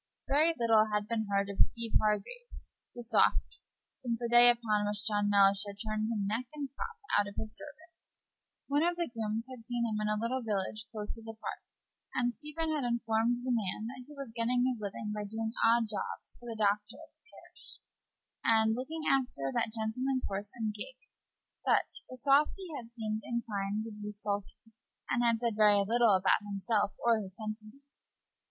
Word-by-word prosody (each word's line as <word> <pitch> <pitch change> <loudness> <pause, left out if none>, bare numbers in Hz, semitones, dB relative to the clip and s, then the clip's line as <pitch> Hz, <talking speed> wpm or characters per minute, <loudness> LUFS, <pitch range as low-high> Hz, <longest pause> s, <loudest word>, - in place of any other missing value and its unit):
Very 315 +4 +4
little 225 -2 +4
had 210 0 0
been 220 -2 -1
seen 200 0 +1
of - - -12
Steeve 230 -1 +1
Hargraves, 215 - -2 0.3
the 240 - -5
softy, 225 -1 +2 0.3
since 240 -3 -3
the 240 - -1
day 240 +1 +8
upon 215 -3 +2
which 205 0 -1
John 205 -2 +2
Mellish 200 -1 +5
had 200 0 -7
turned 215 +1 -1
him 210 -3 -1
neck 225 +5 -1
and 280 -2 -4
crop 460 +10 -5 0.2
out 205 - +1
of 200 - -13
his 220 -1 -4
service. 315 +5 -13 0.6
One 285 +1 +2
of 345 +1 +2
the 345 0 0
grooms 225 0 -2
had 255 -2 -9
seen 240 -1 0
him 215 -2 -1
in 210 - 0
a 215 - +1
little 245 +4 -1
village 215 -1 -2
close 210 -2 -5
to 225 - -12
the 225 0 -9
Park, - - -5 0.5
and 245 -1 +1
Stephen 305 +6 -3
had 295 -3 -1
informed 235 0 +1
the 255 - +1
man 215 -1 -1
that 260 - -9
he 300 - -12
was 270 -5 -7
getting 245 +2 +1
his 250 -4 -1
living 210 +1 -4
by 210 0 -3
doing 220 +2 -3
odd 230 0 +5
jobs 215 -1 -5
for 240 - -11
the 225 - -5
doctor 210 +1 +1
of - - -14
the 470 - -31
parish, - - -10 0.7
and 220 -1 +4
looking 305 +7 -4
after 245 - +1
that - - +1
gentleman's 245 +4 -1
horse 200 +1 -3
and 220 -3 -2
gig; 215 - -7 0.7
but 455 - +1
the 255 - -8
softy 300 +7 +2
had 235 -5 -7
seemed 220 -2 -3
inclined 215 -3 -2
to 225 - -7
be 210 0 -6
sulky, 205 +1 -5 0.4
and 240 - +2
had 235 -1 +4
said 235 0 0
very 205 -2 +5
little 230 -1 +4
about 185 +3 +3
himself 205 0 0
or 230 -2 +5
his 190 -2 -9
sentiments. 215 +5 -7
225 Hz, 190 wpm, -32 LUFS, 210-245 Hz, 0.7 s, day